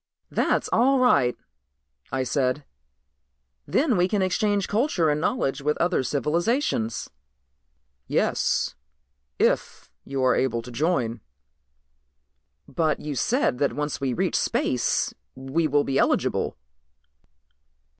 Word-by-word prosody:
"That's - - +1
all 270 +3 +4
right," 245 - +3 0.7
I 130 +1 0
said, 130 +2 0 1.0
"then 275 -4 +2
we 180 0 +3
can 200 0 0
exchange 200 +2 +1
culture 205 - +1
and 150 +1 -1
knowledge 150 - 0
with 150 +2 0
other 175 -3 +1
civilizations." 150 - -1 1.0
"Yes, - - +1 0.6
if - - 0
you 135 -1 -3
are 125 -1 +4
eligible 115 -3 0
to 125 - -10
join." 120 - 0 1.5
"But 160 -2 0
you 150 - -4
said 220 - +1
that 140 - +1
once 150 -1 -3
we 135 -2 0
reach 120 - -1
space - - 0 0.2
we 135 +5 -1
will 145 0 +2
be 135 -1 0
eligible." - - +1
150 Hz, 115 wpm, -25 LUFS, 130-185 Hz, 1.5 s, all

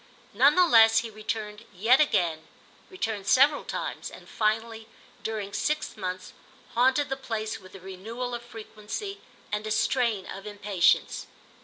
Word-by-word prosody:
None 270 +8 +5
the 365 0 +6
less 225 -7 +6
he 225 -1 -7
returned 215 0 -5
yet 225 +9 +4
again, 165 - +1 0.4
returned 220 - -4
several 280 +5 +5
times, - - -4
and - - -13
finally, 225 +1 -1 0.3
during 210 -2 -4
six 295 +9 -1
months, 185 -2 -5 0.4
haunted 260 +4 +3
the 270 - -1
place 225 -5 -4
with 185 +1 -15
a - - -9
renewal 220 +7 -6
of 240 - -4
frequency 235 - -7 0.3
and 210 +1 -2
a - - -2
strain 225 -2 +1
of 195 +2 -8
impatience. 205 -3 +1
220 Hz, 145 wpm, -27 LUFS, 205-245 Hz, 0.4 s, the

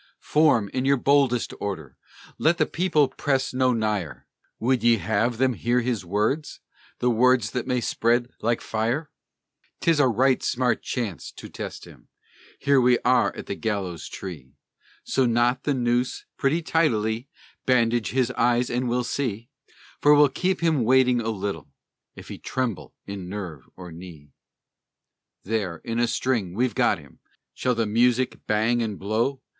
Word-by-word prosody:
Form, 150 -9 +3
in 130 - -1
your 140 +1 +3
boldest 135 -2 +2
order, 80 -10 -5 0.4
Let 170 +2 +3
the - - +3
people 170 -5 +2
press 135 0 -1
no 130 0 +2
nigher! 105 - -2 0.3
Would 125 +2 +1
ye 120 -1 +5
have 110 +5 0
them 130 +1 +2
hear 120 +1 0
to 120 - +1
his 120 -6 -1
words 105 - -1 0.4
The 125 - +1
words 120 -1 +3
that 125 - -3
may 125 -1 0
spread 120 +2 +1
like 115 +1 0
fire? 120 +8 -2 0.7
'Tis 165 -3 +2
a 140 - +5
right 130 +3 +2
smart 125 0 0
chance 115 -9 -4
to - - -10
test - - -7
him - - -16 0.5
(Here 140 -1 +3
we 125 0 +4
are 125 -5 +4
at - - -7
the - - -4
gallows 100 -6 -3
tree), 80 -9 -9 0.5
So 130 -2 +1
knot 120 +2 +1
the 145 - +1
noose 120 0 0
pretty 155 +5 0
tightly 120 -7 0 0.4
Bandage 120 -2 +2
his 125 -1 +1
eyes, 120 0 +1
and 125 +1 -1
we'll 125 +1 0
see 120 -3 -3 0.5
(For 150 0 +6
we'll 145 -1 +6
keep 185 +6 -1
him 160 -6 +2
waiting 125 0 +4
a 115 - -2
little), 100 -8 -4 0.5
If - - -12
he - - -7
tremble 110 - -3
in 100 -3 -7
nerve 90 -8 -7
or 90 -2 -10
knee. 80 -4 -12 1.1
There, 100 -5 -2
in 115 0 -2
a 120 - +3
string, 115 -8 -1
we've 120 0 +1
got - - +2
him! - - -17 0.3
(Shall 125 -1 0
the 115 -1 0
music 120 +4 +1
bang 110 +3 +2
and 105 -4 -3
blow?) 115 +7 -1
120 Hz, 160 wpm, -24 LUFS, 105-130 Hz, 1.1 s, For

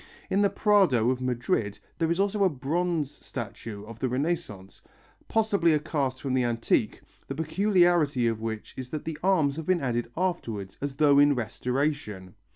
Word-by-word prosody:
In 195 - +3
the 200 - +4
Prado 180 - +3
of 130 0 -3
Madrid 120 -5 -1 0.2
there 165 -1 +1
is 170 +2 0
also 200 +1 +1
a 190 - +5
bronze 155 +1 -1
statue 110 -3 -7
of 115 +1 -11
the 130 - -1
Renaissance, 125 - -3 0.5
possibly 200 -7 +2
a - - +2
cast 140 -4 -2
from 135 -2 -1
the 130 -1 +2
antique, 120 -1 0 0.3
the 135 - -4
peculiarity 170 - +2
of 115 -1 0
which 110 -1 -5
is 130 -1 -7
that 155 +1 -5
the 160 -2 -5
arms 160 -7 +2
have 160 - -6
been 185 -1 +3
added 120 -4 -2
afterwards, 115 - -2
as 140 -1 -3
though 140 -1 +5
in 145 0 +5
restoration. 120 -4 -2
140 Hz, 170 wpm, -27 LUFS, 120-170 Hz, 0.5 s, a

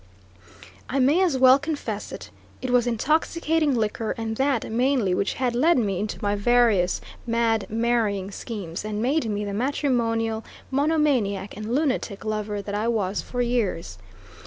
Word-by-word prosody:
I 270 - -1
may 280 +7 +4
as 340 -8 +2
well 260 +1 +7
confess 285 -8 -4
it - - -9 0.3
it 255 - -3
was 245 -1 +3
intoxicating 310 +4 +1
liquor, 220 0 -1
and 225 -1 -3
that 270 -5 0
mainly, 245 -4 +2
which 200 - 0
had 255 -2 0
led 305 +7 +3
me 200 -6 0
into 210 +1 -3
my 205 0 +1
various 210 -4 +3 0.3
mad 230 -2 +1
marrying 220 -4 0
schemes 195 -6 -6
and 210 0 -3
made 255 +1 +1
me 210 0 -2
the 200 - -4
matrimonial 230 -3 0 0.3
monomaniac 265 -10 +1
and 215 +4 -3
lunatic 255 -8 -1
lover 210 -1 -2
that 200 - -6
I 210 +2 -1
was 205 -4 0
for 245 -1 -2
years. 200 - -2
230 Hz, 155 wpm, -24 LUFS, 210-260 Hz, 0.3 s, well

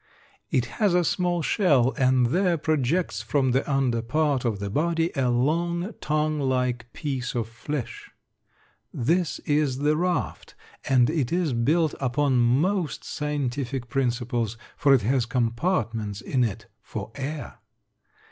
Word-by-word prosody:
It 125 - +1 0.2
has 200 -4 +4
a 180 - +4
small 175 0 0
shell 140 - +3
and 130 -2 +3
there 175 +6 +2
projects 155 +3 0
from 135 -3 +1
the 135 +3 0
under 130 -4 +1
part 140 +2 0
of 110 -4 0
the 100 0 -4
body 165 - +1
a 130 -3 +1
long, 170 - 0
tongue 155 0 0
like 125 -3 -1
piece 135 -5 -4
of 115 -2 -1
flesh. 120 +4 -6 0.8
This 165 +7 0
is 145 -3 +1
the 150 +2 +2
raft, 175 +2 -2 0.3
and 125 -3 +5
it 150 -6 -1
is 170 -5 +1
built 155 +7 +2
upon 135 0 +1
most 150 +8 +1
scientific 135 -4 -3
principles, 120 -3 -1 0.2
for 140 - +3
it 120 - +1
has 125 +1 +1
compartments 115 - -1
in 130 -3 0
it 110 -5 -3 0.2
for - - -7
air. 145 +2 -6
135 Hz, 140 wpm, -25 LUFS, 120-155 Hz, 0.8 s, and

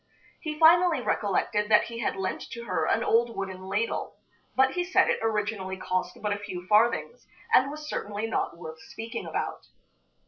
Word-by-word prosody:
He 305 -2 -5
finally 335 0 +6
recollected 210 -2 0
that 210 - +6
he 230 0 -7
had 230 - -1
lent 190 -1 -3
to 235 - -6
her 180 -8 -1
an - - +2
old 230 0 +2
wooden 190 -1 -4
ladle, 210 +4 -2 0.4
but 265 0 +4
he 355 - -1
said 365 +1 +3
it - - 0
originally 210 -3 -1
cost 185 -1 -2
but 210 -1 +1
a 205 - -4
few 180 -3 -7
farthings, 230 - +2 0.3
and 260 +2 +6
was 300 +1 -7
certainly 205 -5 -3
not 225 -6 -2
worth 160 -2 -9
speaking 225 +1 -7
about. - - -4
215 Hz, 175 wpm, -27 LUFS, 190-250 Hz, 0.4 s, finally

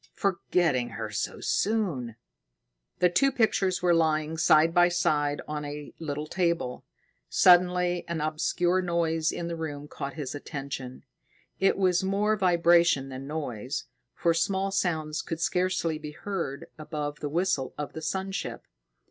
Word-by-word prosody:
"Forgetting 170 -9 +1
her 110 -1 -4
so 105 - -3
soon!" 175 - 0 0.8
The 180 - +4
two 225 +11 +3
pictures 205 -7 +1
were 175 -1 +4
lying 155 -1 +1
side 160 0 +4
by 175 0 +6
side 150 -4 +1
on 150 0 -4
a 145 0 -7
little 150 -2 -4
table. 170 -7 -1 0.5
Suddenly 180 0 +4
an 170 -1 -2
obscure 175 +4 +1
noise 165 -2 0
in 170 - -4
the 170 - -3
room 150 -3 -5
caught 140 -1 -6
his 145 -5 -4
attention. 135 -3 -6 0.6
It 195 - +3
was 185 -2 +2
more 205 +3 +1
vibration 170 -6 +4
than 135 +1 -7
noise, 140 -4 -4 0.3
for 170 -1 +2
small 190 +4 0
sounds 160 -5 -1
could 165 - -5
scarcely 180 -2 0
be 150 -1 -7
heard 170 -6 -4
above 150 -1 -4
the 145 - -3
whistle 165 -4 0
of 150 - -5
the 160 - -6
sun 190 +4 -2
ship. 195 - -5
165 Hz, 145 wpm, -27 LUFS, 150-180 Hz, 0.8 s, by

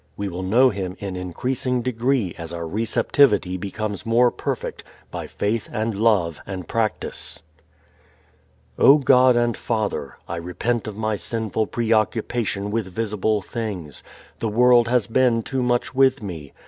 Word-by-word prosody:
We 100 -1 -3
will 90 0 -5
know 120 +8 +4
Him 95 -2 -4
in 100 -2 -5
increasing 125 +7 -2
degree 120 -5 0
as 85 -1 -8
our 85 -1 -5
receptivity 110 - +2
becomes 100 +2 -4
more 120 +1 +3
perfect - - -4 0.3
by - - -5
faith 105 +2 -2
and 110 0 -1
love 100 -7 +1
and 95 -4 -6
practice. 110 -6 -3 1.4
_O 145 +1 +7
God 130 -1 +6
and 120 -1 +2
Father, 105 - -3
I 85 - -4
repent 90 +8 -2
of 105 -1 -6
my 110 -1 -1
sinful 110 +2 -2
preoccupation 110 -2 0
with 110 -2 -1
visible 105 +1 -1
things. 100 - -5 0.4
The 115 - -1
world 120 +1 +5
has 120 -3 +2
been 115 0 +2
too 130 +3 -2
much 120 0 0
with 130 -1 +3
me. 80 -8 -7
110 Hz, 145 wpm, -22 LUFS, 95-120 Hz, 1.4 s, O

